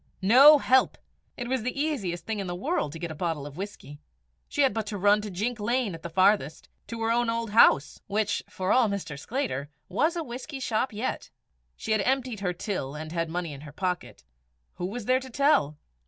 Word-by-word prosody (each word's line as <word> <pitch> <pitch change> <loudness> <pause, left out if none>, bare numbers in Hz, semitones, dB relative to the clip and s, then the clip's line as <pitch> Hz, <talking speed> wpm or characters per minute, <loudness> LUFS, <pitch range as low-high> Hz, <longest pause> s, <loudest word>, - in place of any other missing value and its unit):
No 270 +9 +8
help! 260 -1 +3 0.4
it 245 - -4
was 260 -1 0
the 255 +4 -3
easiest 225 - -2
thing 220 -2 -3
in 195 - -4
the 175 - -3
world 200 - -1
to 165 - -7
get 170 0 -5
a - - -4
bottle 160 -3 -3
of 145 -1 -9
whisky. 180 -6 -8 0.5
She 290 - +1
had 265 - +3
but 220 -1 -3
to 205 -1 -4
run 205 +2 +4
to 210 - -6
Jink 215 +6 -3
Lane 235 -1 0
at 165 - -8
the 170 - -6
farthest, 185 -3 +2 0.2
to 230 - -6
her 225 - +1
own 240 0 +1
old 230 -1 -2
house, 155 -9 +4
which, 205 0 0
for 185 +1 -2
all 250 -4 +4
Mr. 200 -7 -4
Sclater, 145 - -3 0.2
was 310 - +1
a 335 - -2
whisky 260 +2 -7
shop 250 0 -1
yet! 220 +4 -4 0.5
She 225 - -5
had 215 -2 +3
emptied 255 -1 0
her 190 -2 -1
till, 175 -6 -4
and 155 +1 -7
had 165 -1 -2
money 170 -2 -3
in 140 - -10
her 150 -1 -10
pocket. 180 +3 -4 0.5
Who 180 - -2
was 225 +3 -6
there 255 +2 +3
to 260 0 -10
tell? 245 - +2
205 Hz, 215 wpm, -27 LUFS, 175-250 Hz, 0.5 s, No